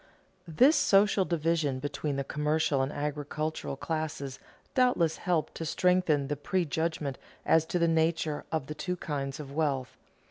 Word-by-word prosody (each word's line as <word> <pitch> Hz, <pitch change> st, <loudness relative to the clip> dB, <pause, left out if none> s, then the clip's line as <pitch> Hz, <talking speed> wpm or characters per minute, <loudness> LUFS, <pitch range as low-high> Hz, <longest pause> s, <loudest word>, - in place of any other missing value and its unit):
This 255 Hz, -, +5 dB
social 205 Hz, -7 st, +4 dB
division 165 Hz, -5 st, 0 dB
between 145 Hz, +1 st, -3 dB
the 140 Hz, -, -1 dB
commercial 150 Hz, 0 st, 0 dB
and 135 Hz, +2 st, -1 dB
agricultural 150 Hz, +1 st, -3 dB
classes 155 Hz, -4 st, -4 dB, 0.3 s
doubtless 245 Hz, -11 st, +3 dB
helped 175 Hz, -4 st, -1 dB
to -, -, -4 dB
strengthen 165 Hz, -3 st, +2 dB
the 145 Hz, -, -1 dB
prejudgment 160 Hz, -2 st, -1 dB, 0.3 s
as 160 Hz, 0 st, +4 dB
to -, -, -1 dB
the 170 Hz, -1 st, +3 dB
nature 160 Hz, -2 st, +1 dB
of 160 Hz, -4 st, -1 dB
the 150 Hz, -, -5 dB
two 180 Hz, +3 st, -3 dB
kinds 140 Hz, -5 st, -4 dB
of 140 Hz, -2 st, -7 dB
wealth. 140 Hz, -5 st, -1 dB
155 Hz, 145 wpm, -29 LUFS, 145-170 Hz, 0.3 s, This